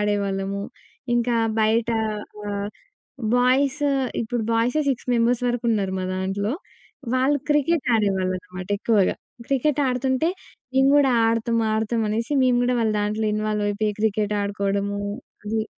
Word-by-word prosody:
ఆడేవాళ్ళము. 200 -1 -1 0.5
ఇంకా 240 0 +1 0.2
బయటా 225 +1 +2 0.5
ఆహ్, 200 0 -2 0.7
బాయ్స్, 265 +4 +2 0.4
ఇప్పుడు 235 +1 -2
బాయ్సే 240 +7 +2
6 260 -2 -2
మెంబర్స్ 235 +1 +2
వరుకున్నారు 225 -5 0
మా 185 - -2
దాంట్లో. 195 +3 -1 0.6
వాళ్ళు 265 +3 +2
క్రికెట్ 295 +1 +2
ఆడేవాళ్ళనమాట 185 -3 -1
ఎక్కువగా. 210 -3 +2 0.3
క్రికెట్ 275 +2 +1
ఆడుతుంటే, 260 +4 +1 0.5
నేను 265 +1 +5
గూడా 285 -2 +5 0.2
ఆడతాం, 230 +1 +1 0.2
ఆడతాం 225 +1 0
అనేసి 230 +5 -2
మేము 250 -1 +3
గూడా 250 0 +1
వాళ్ళ 220 -1 +1
దాంట్లో 210 +1 -1
ఇన్వాల్వయిపోయి 210 0 -1
క్రికెట్ 210 -1 +1
ఆడుకోవడము 200 0 -1 0.5
అది. 220 +1 -1
220 Hz, 120 wpm, -23 LUFS, 205-250 Hz, 0.7 s, నేను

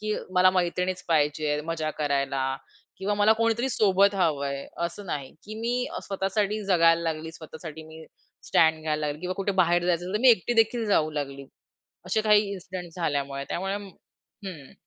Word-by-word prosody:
की 215 0 -1 0.2
मला 185 0 +6
मैत्रिणीच 180 0 -1
पाहिजे 150 -1 +2
आहे 150 - -1
मजा 160 -1 -2
करायला 140 -2 0 0.4
किंवा 200 +2 -1
मला 210 +1 +5
कोणीतरी 230 +3 +1
सोबत 200 -4 +3
हवं 155 -7 +1
आहे. 140 0 -4 0.2
असं 185 +4 -9
नाही, 140 -5 -4
की 215 - -8
मी 245 +2 0 0.2
स्वतःसाठी 200 +2 -1
जगायला 170 -3 +4
लागली, 160 -1 -3
स्वतःसाठी 160 0 -9
मी 160 0 -11 0.4
स्टँड 160 -1 +3
घ्यायला 155 -1 -1
लागली 145 +1 -4
किंवा 180 +1 -3
कुठे 200 +1 -1
बाहेर 175 -2 +3
जायचं 180 - +4
असेल 185 - -5
तर 210 - +2
मी 260 - +6
एकटी 235 +1 +4
देखील 225 +1 +2
जाऊ 160 -7 +2
लागली. 140 -2 -5 0.6
असे 185 +4 +1
काही 210 -1 +5
इन्सिडेंट 180 -2 -7
झाल्यामुळे. 140 -4 -2
त्यामुळे 195 +2 -2 0.7
हं. 155 -8 -8
175 Hz, 170 wpm, -26 LUFS, 155-200 Hz, 0.7 s, मला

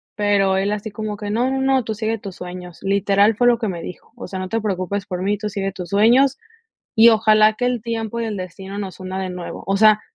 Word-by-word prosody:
pero 200 -2 +2
él 195 +2 0
así 210 +1 -3
como 210 0 -5
que: 205 0 -5
"No, 245 +4 +1
no, 265 0 -1
no, 265 -1 +2
tú 220 - -3
sigue 220 +1 -2
tus 195 -3 -9
sueños", 180 -1 -8
literal, 200 +2 +2
fue 245 - +1
lo 240 -1 +4
que 225 - -1
me 175 -4 -4
dijo, - - -10
"O 240 - -8
sea, 190 - -5
no 185 - -4
te 225 - 0
preocupes 200 -1 -2
por 185 -3 -4
mí, 200 +2 0
tú 210 0 -4
sigue 195 -1 -3
tus 180 -2 -7
sueños, 245 +7 +4 0.6
y 225 +1 +7
ojalá 215 -1 +4
que 245 - -3
el 245 -1 0
tiempo 230 0 -3
y - - -1
el 220 -2 -3
destino 190 +2 -7
nos 195 -2 -6
una 185 +1 -4
de 190 - -3
nuevo", 180 -1 -7
o 195 +1 +1
sea, 215 +1 +5
205 Hz, 255 wpm, -20 LUFS, 190-225 Hz, 0.6 s, y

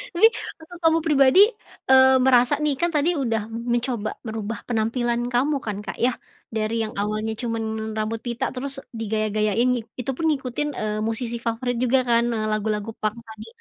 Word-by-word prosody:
Ini 440 +6 +7 0.3
waktu 320 +2 -12
kamu 325 0 +4
pribadi, 295 0 +4 0.5
eee, 265 0 +7
merasa 255 +2 +4
nih 300 -2 +1
kan 340 +5 0
tadi 320 +3 +1
udah 225 -6 -1
mencoba 235 -1 -2
merubah 220 0 -4
penampilan 240 +1 0
kamu 275 +3 +1
kan, 205 -2 -4
Kak, 210 - -6
ya, 245 +2 +2 0.4
dari 220 +1 -1
yang 215 - -4
awalnya 215 +2 -1
cuman 220 -2 -3
rambut 220 +1 -2
pita 240 0 -3
terus 275 +1 -6
digaya-gayain 215 0 0
nih, 245 -2 0
itu 250 +1 -3
pun 320 +5 -2
ngikutin, 280 -1 -1
eee, 215 0 -2
musisi 230 +2 -2
favorit 235 +1 -2
juga 255 +1 +3
kan, 235 -1 +2
nah 225 -2 -1
lagu-lagu 215 0 -1
punk 215 0 -3
tadi. 220 -1 -11
235 Hz, 170 wpm, -23 LUFS, 220-260 Hz, 0.5 s, Ini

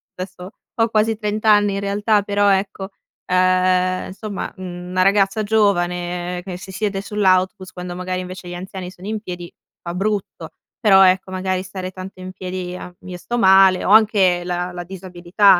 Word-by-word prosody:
adesso, 185 0 -8 0.3
ho 225 - +3
quasi 220 0 +1
30 210 0 -3
anni 205 -2 +5
in 195 - -1
realtà, 205 +1 +1
però 205 0 +2
ecco, 195 0 -2 0.4
ehm, 185 0 +2
insomma, 200 +1 -6
mhmm, 180 -1 -7
una 185 0 +1
ragazza 195 +2 +3
giovane 180 -4 0
che 185 -2 -5
si 190 +1 -10
siede 195 0 -2
sull'autobus, 190 -2 +1
quando 180 -1 -7
magari, 185 0 -3
invece, 185 0 -8
gli - - -6
anziani 185 0 -7
sono 185 +1 -11
in 215 0 -2
piedi, 175 -3 -7 0.3
fa 170 0 -5
brutto. 205 +1 -3 0.3
Però, 195 -4 +6
ecco 185 +1 +2
magari 185 0 -1
stare 185 -1 -6
tanto 185 0 -9
in 185 0 -7
piedi 185 -1 -5
i 180 - -6
a 180 - -9
io 180 -1 -8
sto 240 +7 -4
male. 190 -2 +6
Ho - - -1
anche 200 -5 +5
la 180 0 -2
la 175 0 -6
disabilità, 185 +1 +2
185 Hz, 175 wpm, -20 LUFS, 180-200 Hz, 0.4 s, Però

